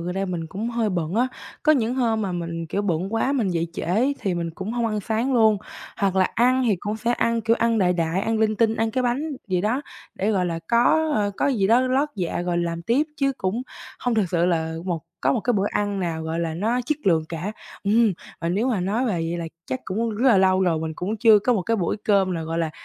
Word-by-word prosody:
gần 175 +1 -3
đây 195 0 -1
mình 175 -3 -3
cũng 205 +8 -4
hơi 230 -2 0
bận 170 -2 -2
á, 245 +3 +2 0.3
có 310 - +5
những 245 -4 +1
hôm 230 -4 +1
mà 195 -3 -2
mình, 170 -1 -4
kiểu, 195 +6 -2
bận 190 +2 -1
quá 245 +4 +1
mình 240 -8 +1
dậy 170 -2 0
trễ - - -5
ấy, 230 - +1
thì 190 -3 -1
mình 170 -1 -2
cũng 190 +6 -5
hông 240 -1 0
ăn 215 -1 -1
sáng 225 +6 -1
luôn. 220 -3 +4 0.4
Hoặc 195 -2 0
là 185 - +5
ăn 255 +2 +3
thì 210 -4 +3
cũng 210 +1 -3
sẽ 230 +2 0
ăn, 230 -1 +1
kiểu, 230 +1 +2
ăn 230 -1 +2
đại 180 -3 +3
đại, 170 +1 0
ăn 225 +2 0
linh 215 -1 +2
tinh, 225 -1 +3
ăn 225 0 0
cái 255 +3 0
bánh 265 +6 -1 0.2
gì 185 -1 +1
đó 225 +8 0 0.3
để, 200 +3 0
gọi 190 -4 +1
là, 165 -1 -2
có, 305 +7 +3
ờ, 205 -1 +1
có - - +1
gì 230 -9 +2
đó 230 +4 +5
lót 260 +3 +1
dạ 175 -2 -2
rồi 175 -1 -1
làm 170 -1 -2
tiếp, 235 - +2
chứ 275 -1 +1
cũng 200 +6 -1 0.4
hông 245 -1 0
thực 210 -5 +1
sự 170 0 +2
là 160 -2 0
một 175 -3 -2 0.2
có 135 - +2
một - - 0
cái 245 - +1
bữa 200 -2 +1
ăn 205 -1 -1
nào, 165 -3 -2
gọi 160 +1 -2
là, 165 -1 -2
nó 225 +8 0
chất 305 +2 0
lượng 165 -4 +3
cả. 170 +5 -4 0.3
Ừm, 215 +1 +4 0.3
và 165 - -1
nếu 210 +9 +1
mà 220 -7 0
nói 205 +8 0
về 215 - 0
vậy 165 0 -2
là 170 - -4 0.2
chắc 260 - -3
cũng 225 +5 -1
rất 230 +5 +2
là 215 -6 +6
lâu 190 0 +4
rồi 170 -3 +2
mình 160 0 -3
cũng 205 +5 -2
chưa 220 0 +6
có 245 +5 +1
một 200 -6 0
cái 230 +3 0
buổi 175 -5 -1
cơm 195 -3 +3
nào, 165 -1 -3
gọi 165 +1 -3
là, 165 -2 0
205 Hz, 270 wpm, -23 LUFS, 175-230 Hz, 0.4 s, là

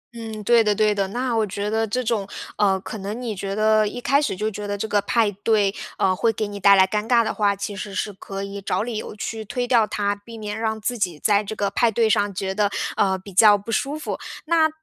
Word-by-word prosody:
嗯， 220 -2 -7
对 235 +2 +5
的 210 -1 +2
对 210 0 +3
的， 200 -1 -1
那 245 +4 -2
我 225 - +2
觉 205 +2 -3
得 225 0 +1
这 250 +4 -1
种， 220 -4 -1 0.3
呃， 195 -2 +3
可 215 - -7
能 205 +4 -5
你 235 -4 -4
觉 195 +1 -4
得 215 0 +3
一 225 - -5
开 275 +3 +2
始 290 - -1
就 210 +3 -1
觉 210 0 -6
得 205 0 -2
这 220 - -3
个 205 -1 +2
派 215 +1 +1
对， 205 0 +1 0.2
呃， 185 -1 +2
会 225 +4 +2
给 215 -1 -3
你 205 0 -7
带 200 +1 +7
来 190 -1 +6
尴 210 +3 -2
尬 235 -2 +5
的 - - -2
话， 205 -1 +1
其 200 +1 -5
实 200 -1 -6
是 205 +2 -2
可 195 +1 -7
以 200 0 -6
找 200 - -1
理 235 -1 -4
由 215 - -6
去 220 +1 -5
推 245 +4 -3
掉 235 -4 +4
它， 205 -1 -1
避 225 +3 -12
免 210 0 -5
让 220 -1 -1
自 240 +3 -3
己 180 -6 -1
在 205 +6 +2
这 210 +1 -6
个 200 -1 -1
派 235 - +3
对 225 +1 +2
上 205 -1 +2
觉 190 +1 -2
得， 205 0 +1 0.3
呃， 190 -2 +2
比 190 +1 -12
较 205 +2 +7
不 205 +3 -8
舒 275 +6 -1
服。 310 - -5 0.3
那 320 -1 +3
210 Hz, 280 characters per minute, -23 LUFS, 200-225 Hz, 0.3 s, 带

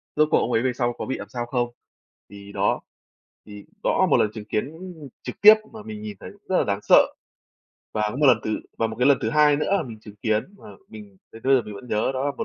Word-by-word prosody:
rốt 155 0 +4
cuộc - - +5
ông 125 - -1
ấy 115 - +2
về 130 - +1
sau 120 -1 -1
có - - -4
bị 130 - -3
làm - - -9
sao 120 -1 -4
không. 120 0 -1 0.6
Thì 100 0 -12
đó, - - 0 0.6
thì 105 -1 -11 0.2
đó - - +1
là - - +4
một - - +5
lần 105 - +2
chứng 110 -2 -8
kiến 110 +7 -2 0.5
trực - - -8
tiếp 215 +1 +10 0.2
mà 220 -2 -9
mình 215 -1 -8
nhìn 215 -1 -7
thấy - - -9
cũng 205 - -21
rất 185 - +2
là - - +3
đáng 100 -1 -1
sợ. 100 - +5 0.8
Và 105 - -1
có 105 - -6
một 145 +1 +3
lần 125 -4 +6
thứ 110 - -1 0.2
và 115 - +2
một 110 - -6
cái 125 - +3
lần 140 - +5
thứ - - 0
hai 150 -1 +4
nữa 150 - -2
là - - 0
mình 115 -4 -9
chứng 105 -1 -13
kiến 110 +1 0
mà - - -13 0.2
mình 105 -3 -12 0.2
đến 115 - -12
bây 135 +1 +4
giờ 125 - +3
mình 105 -1 -9
vẫn 125 +5 -11
nhớ 105 +3 0
đó 130 +2 -2
là 145 - +1
một - - -3
120 Hz, 280 wpm, -24 LUFS, 105-145 Hz, 0.8 s, tiếp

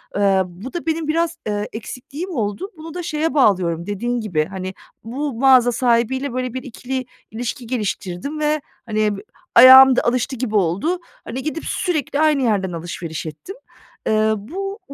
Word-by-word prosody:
eee, 195 -2 +3
bu 185 - -10
da 345 -2 -4
benim 320 -1 -1
biraz, 335 +1 0
eee, 205 0 -2
eksikliğim 275 - -7
oldu. 215 - -3
Bunu 320 +1 -9
da 355 - -5
şeye 320 -1 -1
bağlıyorum, 180 - +2
dediğin 240 +4 -2
gibi, 170 -8 0
hani, 190 +1 -6 0.3
bu 270 +6 -3
mağaza 250 0 +5
sahibiyle 245 +2 +1
böyle 255 -1 -2
bir 260 - -5
ikili 260 0 -5 0.3
ilişki 235 +1 -5
geliştirdim 220 - -3
ve, 300 0 +1 0.2
hani, 215 -1 +1 0.4
ayağım 260 +1 +10
da - - +3
alıştı 250 +2 0
gibi 230 -3 -3
oldu. 200 - +1 0.3
Hani, 255 +3 -5
gidip 310 +1 -4
sürekli 310 -6 -1
aynı 305 -4 +3
yerden 200 -5 +1
alışveriş 165 -1 -5
ettim. 155 - -8 0.5
Eee, 215 0 +3
bu, 390 - -6
245 Hz, 155 wpm, -20 LUFS, 205-300 Hz, 0.5 s, ayağım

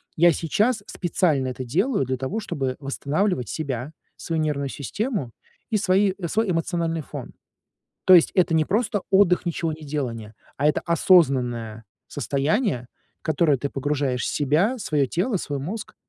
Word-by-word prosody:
Я 170 +1 +6
сейчас 215 +8 +1
специально 160 -6 0
это 130 +1 -5
делаю 190 - +1
для 130 0 -2
того, 135 - -3
чтобы 135 -12 -3
восстанавливать 140 - -1
себя, 135 -2 -4 0.2
свою 165 -2 -2
нервную 140 -3 -1
систему 150 - -3 0.4
и 220 - +2
свои 195 -1 +2
свой 220 +3 0
эмоциональный 165 -2 -1
фон. - - -8 0.7
То 185 - +8
есть 170 - +5
это 180 -2 +3
не 160 -1 +4
просто 205 +1 0
отдых, 190 -2 +4
ничегонеделание, 145 -9 -3 0.2
а 145 +2 +1
это 150 - +1
осознанное 125 - +2 0.2
состояние, 140 - -1 0.3
которое 155 -2 +2
ты 140 +3 -3
погружаешь 135 -2 -1
себя, 160 - +1
свое 150 - 0
тело, 195 - -1
свой 145 -4 -4
мозг 205 +10 -5
155 Hz, 140 wpm, -24 LUFS, 135-185 Hz, 0.7 s, То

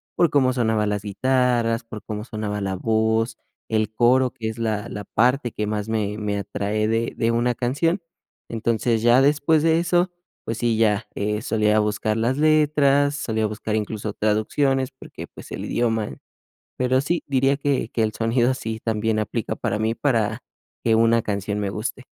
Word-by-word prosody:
por 170 - +3
cómo 130 -3 +3
sonaban 110 -4 +1
las 105 0 -2
guitarras, 120 +1 +1
por 110 -2 -9
cómo 105 0 -5
sonaba 105 -2 -4
la 95 -1 -2
voz, 110 +3 0 0.3
el 110 -1 0
coro, 125 +2 +3
que 110 -1 -4
es 110 - -7
la 110 -2 -2
la 105 -1 -6
parte 125 +1 +1
que 105 - -3
más 105 0 -2
me 105 -2 -1
me 105 -1 -2
atrae 105 +2 -2
de 115 +1 0
de 115 0 +1
una 120 +1 +1
canción. 165 - 0 0.5
Entonces, 115 0 0
ya 120 +3 +5
después 150 +2 +3
de 165 0 +4
eso, 175 +1 +1 0.3
pues, 115 - -4
sí, 120 -1 +1
ya, 110 -1 +2
eh, 105 +1 -1
solía 105 -1 +2
buscar 110 +1 0
las 120 +4 0
letras, 145 -2 +3
solía 110 -5 -1
buscar, 110 0 -3
incluso, 105 0 -3
traducciones, 130 +6 +1
porque, 130 - -10
pues, - - -13
el - - -5
idioma. 115 -3 -1 0.6
Pero 130 +1 +2
sí, 170 +5 -1
diría 135 0 +2
que 140 -5 -1
que 115 - 0
el 110 -1 0
sonido 120 +3 +1
sí 110 -3 -5
también 110 -1 0
aplica 110 +1 -2
para 105 - -2
mí, 110 +1 0
para 115 -3 0 0.4
que 115 - +3
una 115 0 +4
canción 105 -1 -2
me 100 -1 -1
guste. 115 +5 -4
115 Hz, 175 wpm, -23 LUFS, 110-130 Hz, 0.6 s, ya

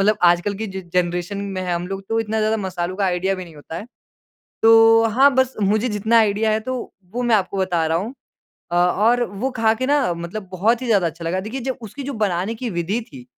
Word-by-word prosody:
मतलब 210 +2 +3
आजकल 175 +3 +3
की 220 +3 -4
जो 190 -1 -6
जनरेशन 180 +2 0
में 200 -2 -4
है 180 -1 -1
हम 175 +1 -3
लोग 195 0 -5
तो 225 0 +1
इतना 220 0 -2
ज़्यादा 215 +1 +1
मसालों 185 -2 -3
का 200 - 0
आइडिया 185 +2 0
भी 185 - -6
नहीं 165 -3 -14
होता 155 +2 -8
है। 205 - -7 0.8
तो 225 0 +7
हाँ 270 +5 +5
बस 260 0 +2
मुझे 215 +5 +2
जितना 220 +2 +2
आइडिया 215 0 +2
है 215 - +1
तो, 255 +2 -5 0.2
वो 245 +1 -2
मैं 240 -2 +3
आपको 195 -1 -1
बता 175 -4 0
रहा 160 +1 +1
हूँ। 210 +8 -4 0.6
अ, - - -1
और 210 +8 +3
वो 240 +4 -3
खा 220 -1 +4
के 255 - -2
ना 280 -10 +2
मतलब 170 +4 -6
बहुत 220 +7 +1
ही 255 - -4
ज़्यादा 200 -6 +3
अच्छा 165 +1 -7
लगा। 175 +3 -1
देखिए 260 +4 -5
जब 260 - -3
उसकी 280 +7 -8
जो 280 +1 -4
बनाने 190 +4 -2
की 250 - -2
विधि 185 +5 -2
थी, 250 -2 -11
205 Hz, 235 wpm, -21 LUFS, 180-225 Hz, 0.8 s, तो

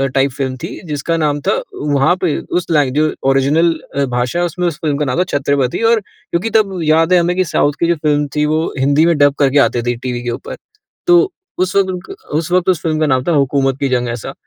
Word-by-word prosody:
Type 135 0 +2
film 130 -1 -3
थी, - - -7
जिसका 150 +3 -2
नाम 150 -2 0
था - - +1 0.2
वहाँ 145 +3 +1
पे 165 -5 0
उस 175 0 -3
लाइ 145 -5 +2
जो 155 +3 +1 0.2
ओरिज़िनल 145 +5 +3 0.2
अ, 140 0 +1
भाषा 125 +4 -2
है 175 - +2
उसमें 175 +1 -2
उस 165 -3 -3
फ़िल्म 150 -3 0
का 150 - 0
नाम 130 +5 -1
था - - +4
छत्रपति 140 - 0
और 230 - +3
क्योंकि 190 +1 -5
तब 195 -4 0
याद 160 +3 +3
है 180 - +6
हमें 175 +1 0
की 185 - +3
साउथ 145 -2 +1
की 170 - +3
जो 170 - +2
फ़िल्म 150 -1 0
थी 150 0 +2
वो 155 +1 +1 0.2
हिंदी 140 +4 +3
में 170 -2 +2
डब 145 -1 +4
करके 140 0 +3
आती 120 -3 +2
थी 120 0 -1
टीवी 125 0 -4
के 120 - -3
ऊपर। - - -6 0.5
तो 355 +2 +5 0.3
उस 185 +1 0
वक़्त 185 -2 +1
क 390 - -7 0.2
उस 165 +1 -3
वक़्त 180 0 +2
उस 175 -3 +1
फ़िल्म 155 -2 -1
का 155 - +2
नाम 130 -2 +1
था 170 - -1
हुकूमत 135 -2 +1
की 140 - 0
जंग 125 -1 0
ऐसा। 115 -2 -5
150 Hz, 245 wpm, -16 LUFS, 135-170 Hz, 0.5 s, है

